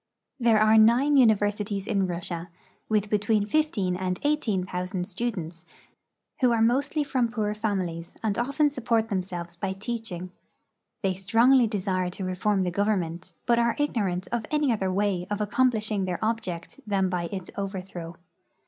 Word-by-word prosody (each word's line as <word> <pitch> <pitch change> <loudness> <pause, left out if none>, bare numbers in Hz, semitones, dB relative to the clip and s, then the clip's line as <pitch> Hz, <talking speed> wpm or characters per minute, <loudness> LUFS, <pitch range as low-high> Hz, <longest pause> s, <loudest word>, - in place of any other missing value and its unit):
There 235 -3 +4
are 215 +1 +6
nine 245 +7 +5
universities 210 -4 +2
in 195 -3 +1
Russia, 170 0 -5 0.4
with 210 -1 +2
between 210 0 +1
fifteen 210 -9 +1
and 185 0 -2
eighteen 240 -11 +1
thousand 180 0 -3
students, 180 -6 -4 0.8
who 250 -2 +4
are 230 - +2
mostly 275 +7 +2
from 260 -4 +1
poor 215 -3 -1
families 185 -6 -3
and 210 -3 0
often 280 +5 +1
support 230 -4 0
themselves 180 -3 -4
by 190 +2 -3
teaching. 195 -4 -5 0.7
They 190 -1 +2
strongly 230 +6 +4
de 210 -2 -2
sire 185 -1 -1
to 190 +2 -6
reform 190 +2 0
the 180 - -1
government, 180 -3 -1
but 235 -1 +3
are 235 0 +2
ignorant 195 -11 -1
of 230 -2 -2
any 300 -3 +2
other 190 -4 -1
way 190 -2 0
of 205 0 -2
accomplishing 215 -2 +1
their 180 -2 -2
object 205 -2 -3
than 195 -2 +2
by 180 -2 -2
its 190 +1 -6
overthrow. 185 -4 -5
205 Hz, 155 wpm, -26 LUFS, 185-230 Hz, 0.8 s, are